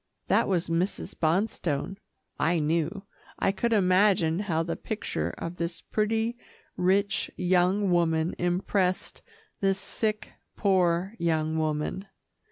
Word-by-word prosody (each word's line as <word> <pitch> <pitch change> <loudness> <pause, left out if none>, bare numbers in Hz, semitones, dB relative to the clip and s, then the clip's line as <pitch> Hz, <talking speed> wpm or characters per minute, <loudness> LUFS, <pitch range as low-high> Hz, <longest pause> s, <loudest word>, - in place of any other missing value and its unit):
That - - +3
was 180 -3 0
Mrs. 170 +4 -1
Bonstone, 170 -1 -1 0.4
I 170 +2 +2
knew. 165 +5 0 0.3
I 195 - +2
could 230 +5 -1
imagine 185 -4 +3
how 170 -6 0
the 165 0 -3
picture 85 - -3
of 170 +1 -5
this 170 0 -3
pretty, 225 +2 -1 0.4
rich 200 +3 +1
young 185 +2 +2
woman 165 -1 +2
impressed 180 +1 0 0.4
this 195 -1 +2
sick, 215 0 -3 0.3
poor 185 -1 +2
young 160 -2 0
woman. 155 +5 -2
180 Hz, 115 wpm, -27 LUFS, 165-200 Hz, 0.4 s, That